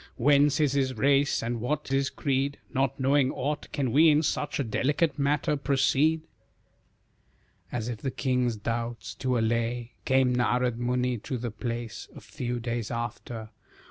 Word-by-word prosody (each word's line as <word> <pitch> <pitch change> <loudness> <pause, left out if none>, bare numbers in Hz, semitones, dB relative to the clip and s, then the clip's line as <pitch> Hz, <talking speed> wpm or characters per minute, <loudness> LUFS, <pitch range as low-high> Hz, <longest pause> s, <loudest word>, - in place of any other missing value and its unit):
Whence 145 +3 +4
is 150 -3 +3
his 130 -2 0
race 140 +3 +3
and 115 0 -2
what 150 +5 -2
his 135 0 +1
creed? 140 +1 -1 0.2
Not 135 +1 0
knowing 135 0 +3
aught, 145 +3 -3
can 135 -5 -1
we 160 +5 +6
in 150 +1 +4
such 145 -1 -1
A - - +2
matter 145 +8 +1
delicate, 140 0 0
proceed?" 145 +3 +2 1.5
As 120 -2 -3
if 120 -3 -4
the 135 - -2
king's 125 -2 0
doubts 115 -1 -4
to 130 -1 -1
allay, 115 +1 -1
Came 130 -1 +3
Narad 125 -1 +1
Muni 125 0 0
to 130 +5 -4
the 120 -1 -4
place 115 0 -5
A - - -8
few 120 -1 -4
days 115 -1 -3
after. 115 -1 -5
130 Hz, 155 wpm, -27 LUFS, 120-140 Hz, 1.5 s, we